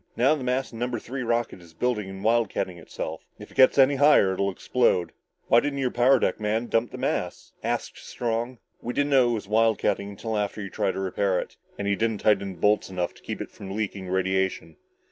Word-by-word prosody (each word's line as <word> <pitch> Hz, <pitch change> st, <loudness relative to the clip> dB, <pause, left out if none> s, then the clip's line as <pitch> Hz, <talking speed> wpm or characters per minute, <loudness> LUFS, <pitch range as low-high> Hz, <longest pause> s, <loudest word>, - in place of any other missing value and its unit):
Now 130 Hz, +5 st, +4 dB
the 150 Hz, -4 st, -3 dB
mass 125 Hz, 0 st, -1 dB
in 115 Hz, -, -8 dB
number 120 Hz, 0 st, -1 dB
three 130 Hz, +4 st, -6 dB
rocket 115 Hz, -5 st, -1 dB
is 85 Hz, -1 st, -17 dB
building 105 Hz, -2 st, -1 dB
and 95 Hz, 0 st, -8 dB
wildcatting 110 Hz, -5 st, 0 dB
itself. -, -, -6 dB, 0.2 s
If -, -, -12 dB
it -, -, -18 dB
gets 130 Hz, -, +6 dB
any 135 Hz, +1 st, +5 dB
higher, 145 Hz, -9 st, +5 dB
it'll 100 Hz, +1 st, 0 dB
explode." 95 Hz, -2 st, +1 dB, 0.4 s
"Why 115 Hz, -, +6 dB
didn't 145 Hz, +2 st, -2 dB
your 130 Hz, -2 st, 0 dB
power 125 Hz, +3 st, +4 dB
deck -, -, 0 dB
man 110 Hz, +2 st, 0 dB
dump 115 Hz, 0 st, 0 dB
the -, -, -8 dB
mass?" -, -, -3 dB
asked -, -, -3 dB
Strong. 120 Hz, +1 st, -3 dB, 0.2 s
"We 120 Hz, -, -4 dB
didn't 145 Hz, 0 st, +1 dB
know 130 Hz, -3 st, +5 dB
it -, -, +1 dB
was 105 Hz, -3 st, -4 dB
wildcatting 110 Hz, -2 st, +1 dB
until 110 Hz, +2 st, -3 dB
after 105 Hz, +1 st, -3 dB
he 100 Hz, -, -4 dB
had 95 Hz, -, -10 dB
tried 95 Hz, -, 0 dB
to -, -, -4 dB
repair 95 Hz, 0 st, 0 dB
it. -, -, -7 dB, 0.2 s
And 100 Hz, -, -3 dB
he 100 Hz, -, +2 dB
didn't 110 Hz, 0 st, 0 dB
tighten 100 Hz, -2 st, +2 dB
the -, -, -16 dB
bolts 105 Hz, +1 st, +2 dB
enough 90 Hz, -2 st, -2 dB
to -, -, -19 dB
keep -, -, -5 dB
it -, -, -7 dB
from 95 Hz, 0 st, -8 dB
leaking 100 Hz, -3 st, -3 dB
radiation." 95 Hz, -3 st, -1 dB
110 Hz, 225 wpm, -26 LUFS, 95-125 Hz, 0.4 s, gets